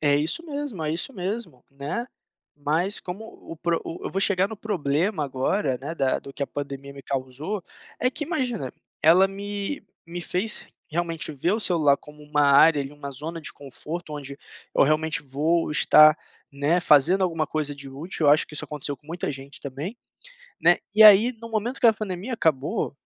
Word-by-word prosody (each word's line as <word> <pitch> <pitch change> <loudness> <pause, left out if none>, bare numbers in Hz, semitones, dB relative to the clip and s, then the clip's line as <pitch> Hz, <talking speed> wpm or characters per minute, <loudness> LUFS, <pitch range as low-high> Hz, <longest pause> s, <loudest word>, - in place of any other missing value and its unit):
É 145 -2 +3
isso 155 - 0
mesmo, 285 - -4
é 155 - -1
isso 170 +11 -2
mesmo, 185 - -5
né, 140 - -4 0.5
mas 160 +7 0
como 185 +4 -7
o 220 - -12
o - - -8
pro 170 +1 0 0.2
eu - - -3
vou 195 - -1
chegar 195 -1 +4
no 220 - -7
problema 175 -3 -1
agora, 135 +1 -1
né, 145 +5 -5
da 135 -5 +1
do 140 - -11
que - - -4
a - - 0
pandemia 140 -1 -6
me 140 0 -11
causou, 140 +10 -4 0.4
é 250 - +2
que 300 +3 -3
imagina, 255 - -2 0.3
ela 175 +5 +7
me 200 +6 -4 0.2
me 175 +1 -6
fez 185 +5 -3 0.2
realmente 165 -1 -2
ver 150 +6 0
o 215 - +1
celular 155 -8 +3
como 150 +1 -15
uma 150 0 +1
área 145 +2 +6
ali, 135 +1 -8
uma 145 -1 -7
zona 155 +5 -6
de 155 - -5
conforto 150 +4 -7
onde 140 -1 -7 0.4
eu - - +5
realmente 155 +2 +1
vou 150 +5 0
estar, 155 0 +7 0.4
né, 145 +5 +1
fazendo 170 +4 +5
alguma 165 -3 -1
coisa 150 -1 -2
de 140 -1 -9
útil, 155 +3 -3
eu - - +7
acho 150 - +3
que 150 - -11
isso - - -4
aconteceu 145 -1 -4
com 145 - -28
muita 170 -2 -3
gente 135 +1 -9
também, 145 - -5 0.6
né, - - +6 0.2
e 220 - +7
aí 215 +4 +9
no 230 - -8
momento 225 +4 -2
que 240 - +5
a 225 - +7
pandemia 210 +3 -4
acabou, 150 -11 0
160 Hz, 190 wpm, -25 LUFS, 145-195 Hz, 0.6 s, aí